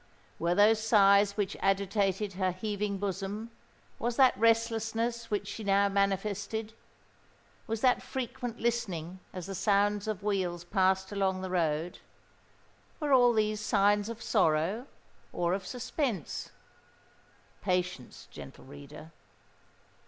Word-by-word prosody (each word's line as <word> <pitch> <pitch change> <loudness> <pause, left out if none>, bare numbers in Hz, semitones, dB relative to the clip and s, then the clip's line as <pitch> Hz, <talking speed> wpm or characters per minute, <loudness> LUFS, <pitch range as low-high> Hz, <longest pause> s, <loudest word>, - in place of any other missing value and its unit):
Were 170 +1 +1
those 215 +2 +5
sighs 200 -2 +5
which 200 -2 -1
agitated 195 0 0
her 185 0 0
heaving 205 +1 -3
bosom,—was 205 +4 -5
that 260 -1 +5
restlessness 230 +1 +1
which 205 -1 -2
she 210 +2 -6
now 200 0 +3
manifested,—was 210 +2 -4
that 255 -1 +3
frequent 245 -2 -5
listening 190 -7 -2
as 185 -2 -6
the 195 - -6
sounds 205 +1 +1
of 210 -2 -3
wheels 185 -4 -1
passed 190 +1 +1
along 190 -2 0
the 185 -1 -5
road,—were 175 - -4
all 245 -2 +6
these 215 -1 0
signs 205 0 +2
of 230 0 -7
sorrow 165 - +1 0.4
or 175 0 0
of 190 -1 -3
suspense? 250 - -3 1.1
Patience, 180 -8 -2
gentle 70 - -11
reader. 145 +3 -12
200 Hz, 110 wpm, -30 LUFS, 185-225 Hz, 1.1 s, all